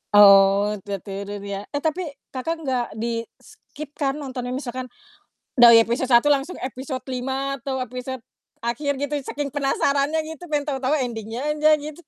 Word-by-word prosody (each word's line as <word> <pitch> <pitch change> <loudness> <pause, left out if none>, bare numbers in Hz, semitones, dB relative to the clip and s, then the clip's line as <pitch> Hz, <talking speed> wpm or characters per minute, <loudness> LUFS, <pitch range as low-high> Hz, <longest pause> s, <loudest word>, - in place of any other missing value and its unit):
Oh, 200 0 +7 0.2
tertidur 200 0 -5
ya. 200 0 -5
Eh, 285 - -2
tapi 320 +2 -1 0.2
Kakak 325 +5 -3
nggak 255 -4 0
di-skip 230 +5 -7
kan 280 -2 -1
nontonnya, 255 -4 -5
misalkan 255 -1 -5 0.7
dari 235 -2 +9
episode 240 +3 0
1 235 +4 +6
langsung 285 +4 0
episode 260 +1 -5
5 265 +2 -2
atau 265 0 -4
episode 255 0 -5 0.4
akhir, 265 +4 -2
gitu? 285 +1 -1
Saking 290 +1 -3
penasarannya 280 +2 +1
gitu, 320 +2 -8
pengen 295 0 0
tau-tau 265 -1 -1
ending-nya 230 -2 -4 0.2
aja, 305 +1 +4
gitu. 305 +2 -8
260 Hz, 145 wpm, -23 LUFS, 235-285 Hz, 0.7 s, dari